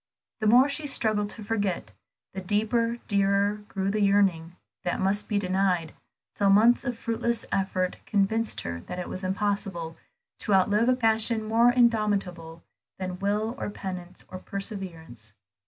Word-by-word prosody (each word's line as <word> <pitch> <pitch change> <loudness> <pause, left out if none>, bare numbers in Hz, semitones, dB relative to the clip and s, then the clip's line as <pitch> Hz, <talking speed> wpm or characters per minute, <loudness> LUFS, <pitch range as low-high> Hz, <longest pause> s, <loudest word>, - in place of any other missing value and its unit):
The 215 - 0
more 245 +5 +6
she 290 +1 -3
struggled 215 -6 +1
to 215 - -5
forget, 205 -4 -2 0.4
the 190 - -5
deeper, 220 +4 0
dearer, 200 0 +2
grew 195 -1 -2
the 215 +1 -1
yearning 195 -4 +2 0.3
that 175 - -1
must 195 +2 0
be 210 - 0
denied, 185 -4 0 0.4
till 200 -1 +2
months 225 +6 +5
of 245 -3 -3
fruitless 230 0 -2
effort 185 -1 -1
convinced 220 +2 0
her 85 0 -5
that - - -5
it 180 - -5
was 185 - -4
impossible 190 -4 -2 0.4
to 205 - +2
outlive 205 +5 +3
a 255 - +4
passion 225 -1 +2
more 225 +2 +4
indomitable 200 -9 +1 0.3
than 185 -1 -5
will, 210 +3 0
or - - -3
penitence, 185 -3 -7
or 185 - -6
perseverance. 175 - -7
200 Hz, 150 wpm, -27 LUFS, 185-220 Hz, 0.4 s, more